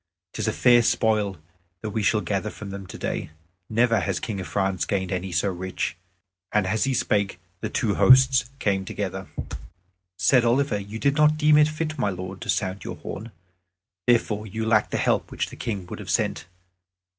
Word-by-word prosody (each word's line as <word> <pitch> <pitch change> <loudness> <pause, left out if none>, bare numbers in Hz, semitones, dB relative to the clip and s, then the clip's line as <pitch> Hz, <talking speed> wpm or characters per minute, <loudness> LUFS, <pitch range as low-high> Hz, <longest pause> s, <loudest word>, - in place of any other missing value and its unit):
'Tis - - -2
a - - +2
fair 120 -1 +5
spoil 105 -4 +1 0.4
that 110 - -4
we 110 +1 -1
shall 105 +1 +2
gather 100 +3 -2
from 100 -1 -8
them 100 -1 -7
today. - - -4 0.4
Never 115 0 +3
has 95 0 -1
King 105 -4 -4
of 90 - -5
France 95 +1 0
gained 95 -3 -1
any 90 0 -2
so 85 +4 +1
rich." 95 -2 -3 0.6
And 105 -2 +2
as 110 +6 +1
he 135 -1 0
spake, 100 -5 0 0.2
the 110 - -3
two 110 -1 0
hosts 130 +1 +6
came 100 -6 0
together. 95 - -4 0.9
Said 105 +7 +4
Oliver, 120 -2 +2
"You 100 +2 -7
did 140 +4 +1
not 150 0 +5
deem 155 0 +5
it 150 0 +6
fit, 155 -1 -3
my 105 - +1
lord, 95 0 -6
to - - -7
sound 95 -2 -1
your - - -5
horn. 110 +3 -7 0.8
Therefore 110 -3 +2
you 110 +3 -3
lack 110 -1 +3
the - - -1
help - - +1
which - - -3
the - - -9
King 100 -5 -4
would - - -8
have - - -8
sent. - - 0
105 Hz, 190 wpm, -25 LUFS, 95-120 Hz, 0.9 s, hosts